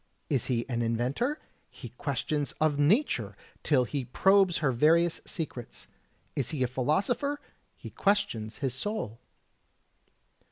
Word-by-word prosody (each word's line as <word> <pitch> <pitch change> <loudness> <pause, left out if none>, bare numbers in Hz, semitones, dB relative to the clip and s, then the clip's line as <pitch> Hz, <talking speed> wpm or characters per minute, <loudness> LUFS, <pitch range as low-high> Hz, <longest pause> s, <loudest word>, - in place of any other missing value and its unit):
Is 135 -5 +1
he 120 -2 0
an 120 -3 -1
inventor? 125 - 0 0.3
He 120 - -10
questions 140 +4 -2
of 155 -2 +2
Nature 145 - +2 0.2
till 140 -4 +3
he 135 +1 -3
probes 190 +6 +4
her 145 -4 +1
various 165 +7 +3
secrets. 135 -7 -6 0.5
Is 135 -4 -1
he 145 -5 -1
a - - +2
philosopher? 195 - 0 0.4
He - - -10
questions 195 - 0
his 130 - -1
soul. 130 - -3
145 Hz, 125 wpm, -29 LUFS, 120-180 Hz, 0.5 s, probes